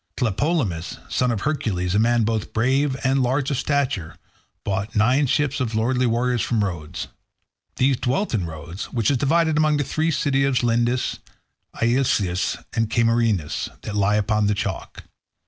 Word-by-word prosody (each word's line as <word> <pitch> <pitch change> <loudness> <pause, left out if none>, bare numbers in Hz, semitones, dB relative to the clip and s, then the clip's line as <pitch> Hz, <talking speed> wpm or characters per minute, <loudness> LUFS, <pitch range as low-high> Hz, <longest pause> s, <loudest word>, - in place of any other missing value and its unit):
Tlepolemus, 115 - -1
son 125 - +1
of 115 -4 -1
Hercules, 95 -12 -1
a 100 - +3
man 120 +1 +3
both 110 0 -2
brave 130 +4 +1
and 135 +1 +2
large 130 +3 0
of 140 - 0
stature, 130 - -1 0.5
brought 100 +4 -2
nine 125 +7 +3
ships 145 +2 0
of 115 -4 -2
lordly 125 +3 +1
warriors 120 +1 +1
from 115 -3 0
Rhodes. 85 -6 -4 0.7
These 130 0 +2
dwelt 130 +12 -1
in 95 -6 0
Rhodes 85 +4 -7
which 115 +1 0
is 135 - +2
divided 160 +4 +2
among 155 -1 +3
the 145 - +1
three 155 +4 -1
cities 135 -3 +1
of 130 -3 +1
Lindus, 120 +1 +1 0.6
Ielysus, 115 -7 +1 0.2
and 115 -1 0
Cameirus, 115 -10 +1
that 105 - -5
lies 105 +1 +2
upon 105 0 +1
the 105 - +1
chalk. 100 -4 -5
120 Hz, 160 wpm, -23 LUFS, 105-135 Hz, 0.7 s, a